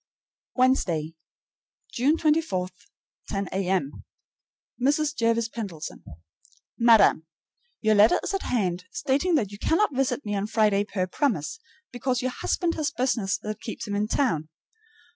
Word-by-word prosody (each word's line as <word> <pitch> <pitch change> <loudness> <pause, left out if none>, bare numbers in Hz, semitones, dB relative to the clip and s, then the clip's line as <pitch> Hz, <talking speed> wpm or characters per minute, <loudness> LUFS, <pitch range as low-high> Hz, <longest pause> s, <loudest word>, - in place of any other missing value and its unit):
Wednesday, 180 - +1 0.8
June 280 +7 +2
24, 300 - +1 0.6
10 195 -1 -3
A.M. 185 -6 -1 0.8
MRS. 295 +3 +1
JERVIS 230 -1 +1
PENDLETON. 200 -10 -7 0.8
Madam: 225 -8 +5 0.5
Your 215 -1 +3
letter 210 +2 +5
is - - -3
at 390 - -1
hand, 185 -7 -1
stating 280 - 0
that 215 -9 0
you 205 - -10
cannot 330 - +2
visit 270 0 0
me 205 - -2
on 200 0 -1
Friday 210 -2 +2
per 185 -3 -2
promise, 225 - -1 0.3
because 245 +1 -1
your 255 - 0
husband 340 +6 -1
has 305 -3 -1
business 235 -8 0
that 215 0 -5
keeps 220 - -6
him 205 - -3
in 205 +1 0
town. 165 - 0
225 Hz, 135 wpm, -26 LUFS, 195-270 Hz, 0.8 s, Madam